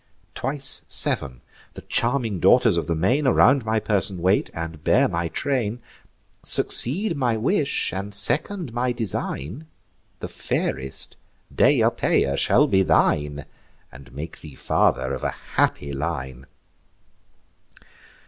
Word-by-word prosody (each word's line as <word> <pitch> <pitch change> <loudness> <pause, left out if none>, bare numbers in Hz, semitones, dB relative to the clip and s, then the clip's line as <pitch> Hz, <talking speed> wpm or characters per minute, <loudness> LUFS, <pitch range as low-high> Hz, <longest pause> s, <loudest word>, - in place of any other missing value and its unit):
Twice 135 +1 +1
sev'n, 65 -3 0 0.3
the - - -10
charming 120 -5 -1
daughters - - +4
of 85 -2 -2
the 85 - -1
main, 125 - 0
Around 135 +1 +4
my 110 0 -1
person 100 -3 0
wait, 95 +4 0
and 80 -2 -7
bear - - +3
my 85 0 -3
train: 120 - -3 0.6
Succeed 170 - +4
my 120 -5 -1
wish, 140 - -1
and 100 +2 -5
second 130 - +2
my 125 +1 -1
design; 110 - -4 0.5
The - - -6
fairest, 65 0 -3 0.4
Deiopeia, 70 0 +2
shall - - +3
be 95 - +2
thine, 75 -5 0 0.5
And 70 +2 -15
make 75 +5 -9
thee 75 -4 -12
father - - 0
of - - -6
a - - -3 0.2
happy 70 0 0
line." 70 -3 -5
100 Hz, 120 wpm, -22 LUFS, 75-125 Hz, 0.6 s, daughters